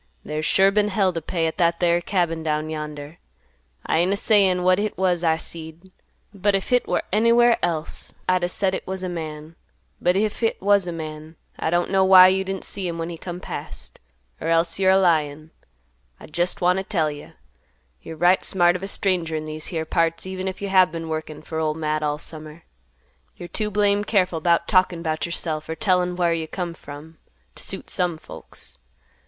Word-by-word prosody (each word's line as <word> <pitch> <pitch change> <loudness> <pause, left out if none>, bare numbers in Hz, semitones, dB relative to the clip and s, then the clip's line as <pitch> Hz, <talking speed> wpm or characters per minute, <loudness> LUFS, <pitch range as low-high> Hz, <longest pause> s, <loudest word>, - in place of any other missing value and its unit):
There's 155 +1 -2
sure 195 +3 +4
been 210 +1 +2
hell 190 -2 +1
t' 165 - -3
pay 165 +1 -2
at 160 +3 -3
that 170 -1 +2
there 175 -1 +2
cabin 170 -3 -1
down 155 0 -2
yonder. 150 0 -7 0.7
I - - +1
ain't 180 +3 +2
a - - -1
sayin' 195 -5 +3
what 185 +1 +4
hit 210 0 -2
was 180 -2 +1
I 160 -1 +3
seed, 165 +3 -6 0.4
but 200 0 +1
if 195 - -2
hit 250 0 +2
war - - 0
anywhere 235 +2 +4
else, 160 -2 -2
I'd 185 -1 +2
a 175 - 0
said 190 +1 +1
hit - - -5
was 190 0 -3
a 185 - -2
man; 155 -2 -7 0.5
but 180 +1 +2
if 210 +1 0
hit 225 -1 0
was 200 -1 +3
a - - -2
man, 155 -1 -7 0.2
I - - -1
don't 175 +2 0
know 190 -1 +3
why 185 -1 +8
you 190 +1 +1
didn't 190 0 -5
see 195 -3 -2
him 170 -1 -4
when 165 +1 -4
he 170 - -7
come 175 -1 -6
past; - - -8 0.4
er - - -3
else 165 +1 +1
you're 190 -1 +3
a 190 - +6
lyin'. 155 -4 +1 0.7
I - - -11
jest 175 +5 -2
want 180 +1 +3
t' - - -3
tell 165 -7 0
you, 145 0 -11 0.7
you're 160 -1 -9
right 175 +3 +3
smart 175 -2 +3
of 185 - -4
a 195 - -4
stranger 180 -5 0
in 155 0 -3
these 155 0 -5
here 160 -2 -3
parts, 165 +1 0
even 190 0 -5
if 190 +1 -5
you 200 - -2
have 185 -3 +5
been 165 0 -5
a - - -7
workin' 155 -1 -5
fer 160 0 -5
Ol' 155 -1 0
Matt 155 -1 -2
all 150 -1 -1
summer. 155 +1 -7 0.7
You're 175 - -8
too 215 -1 -2
blame 205 0 +2
careful 185 -6 +1
'bout 170 0 +2
talkin' 185 -2 +2
'bout 155 0 -2
yourself, 155 -2 -3
or 160 - -3
tellin' 180 -2 +1
whar 175 -2 +1
you 165 -1 -3
come 175 0 -4
from, 155 +1 -12 0.3
t' - - -8
suit - - -3
some 180 -4 0
folks. - - -11
175 Hz, 210 wpm, -23 LUFS, 160-190 Hz, 0.7 s, why